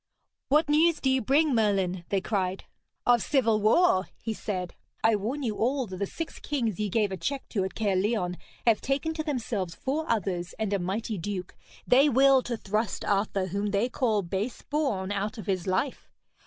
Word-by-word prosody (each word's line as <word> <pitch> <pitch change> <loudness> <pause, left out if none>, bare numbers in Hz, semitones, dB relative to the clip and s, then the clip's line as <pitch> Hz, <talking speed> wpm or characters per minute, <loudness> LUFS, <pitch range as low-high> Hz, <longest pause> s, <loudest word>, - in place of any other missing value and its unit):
'What 300 +3 +4
news 315 +3 +4
do 265 - +1
you 260 0 +2
bring, 285 +5 +3
Merlin?' 195 -5 +1
they 195 -1 +1
cried. 190 -2 -1 0.4
'Of 240 -2 +5
civil 230 -7 +2
war!' 215 - +4
he 225 - -3
said. 185 -4 -4 0.3
'I 225 -1 +4
warn 250 +9 -3
you 220 -4 -2
all 260 +3 +1
that 190 -3 -7
the 200 +1 -2
six 330 - -6
kings 235 -9 -2
ye 210 -1 0
gave 210 0 +1
a 190 - -3
check 270 - -3
to 200 -5 0
at 190 - -4
Caerleon 195 -3 0 0.3
have 230 -2 +4
taken 280 +4 -1
to 315 -1 -3
themselves 225 - -2
four 295 - -2
others 190 -6 -1
and 215 -2 -1
a 200 - +1
mighty 200 +3 -2
duke. 185 0 -5 0.3
They 275 +4 +5
will 270 0 +5
to 240 -2 -4
thrust 215 +2 -2
Arthur, 200 -1 +1
whom 200 +3 -1
they 205 +4 +1
call 220 -5 +1
base 195 +7 -3
born, 245 -11 -1
out 205 +4 -2
of 215 - -7
his 190 -2 -1
life. 190 +9 -1
215 Hz, 190 wpm, -28 LUFS, 195-265 Hz, 0.4 s, Of